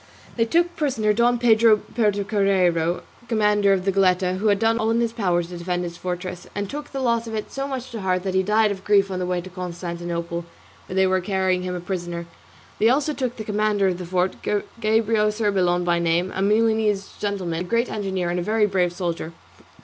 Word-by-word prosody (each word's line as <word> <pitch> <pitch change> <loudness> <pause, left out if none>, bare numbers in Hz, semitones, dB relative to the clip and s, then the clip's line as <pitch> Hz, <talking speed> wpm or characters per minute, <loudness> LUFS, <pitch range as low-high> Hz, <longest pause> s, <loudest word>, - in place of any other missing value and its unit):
They 230 - +2
took 345 +7 +1
prisoner 240 -9 +1
Don 240 +2 +3
Pedro 225 -2 +5
Puertocarrero, 195 -6 +1 0.2
commandant 210 -3 +3
of 185 - -7
the 195 - +3
Goletta, 185 -1 +2
who 215 - 0
had 205 -1 +4
done 225 +2 +2
all 220 0 +1
in 230 +1 +2
his 230 -1 0
power 180 -6 +1
to 175 +1 -9
defend 180 +1 -2
his 170 -1 -5
fortress, 180 0 -5
and 205 0 -2
took 295 +7 -7
the 275 - -4
loss 235 -2 +1
of 225 - -4
it 215 - -4
so 275 0 -3
much 260 -2 -5
to 225 -3 -5
heart 185 -1 0
that 190 -1 -2
he 190 - +3
died 210 +2 +2
of 190 -1 -6
grief 200 -1 +3
on 185 - -2
the 180 - -2
way 180 -1 -1
to 185 - -10
Constantinople, 170 -1 -4 0.4
where 185 - -6
they 190 0 +4
were 185 0 +2
carrying 190 -1 0
him 180 0 -3
a - - -3
prisoner. 175 -1 -4 0.5
They 220 - +5
also 290 +4 +1
took 255 -4 -3
the 220 - -6
commandant 210 -2 +1
of 175 - -4
the 180 - -5
fort, 185 +1 -1
Gabrio 215 0 +1
Cerbellon 190 -5 +1
by 175 -1 +1
name, 170 +2 +1
a 190 - -2
Milanese 215 -1 +1
gentleman, 190 -5 -2
a - - -2
great 235 +1 +2
engineer 190 -4 -2
and 175 - -1
a - - -2
very 215 +2 +2
brave 185 -3 +1
soldier. 170 -2 -4
195 Hz, 215 wpm, -23 LUFS, 180-220 Hz, 0.5 s, Pedro